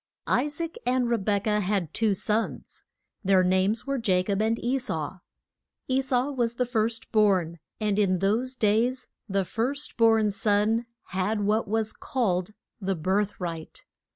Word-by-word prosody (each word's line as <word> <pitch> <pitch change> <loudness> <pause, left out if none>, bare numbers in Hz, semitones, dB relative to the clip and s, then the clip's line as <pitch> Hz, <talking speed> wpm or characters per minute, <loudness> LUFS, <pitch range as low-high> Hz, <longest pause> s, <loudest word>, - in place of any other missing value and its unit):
I 255 - +2
SAAC 320 +3 -3
and 250 0 +1
Re 235 - +3
bek 200 -1 0
ah 210 -1 +2
had 195 -5 -1
two 220 -3 +2
sons. 215 +4 -3 0.4
Their 190 -1 +4
names 190 +4 +1
were 275 -2 -1
Ja 185 -3 +3
cob 200 +1 -1
and 225 +1 +1
E 255 +4 0
sau. 165 - -4 0.7
E 260 0 +2
sau 260 +1 0
was 240 -3 -1
the 250 - 0
first 225 -1 -1
born, 190 -6 +2 0.2
and 210 -1 0
in 190 -3 +3
those 225 +8 0
days 240 +3 +1 0.2
the 195 -1 +1
first 270 - -3
born 225 -2 +4
son 210 +3 +1 0.2
had 200 +3 -1
what 210 +2 +1
was 220 +1 -1
called 185 -8 -1 0.3
the 195 0 0
birth 195 +5 0
right. 165 -3 -5
215 Hz, 160 wpm, -27 LUFS, 195-235 Hz, 0.7 s, Their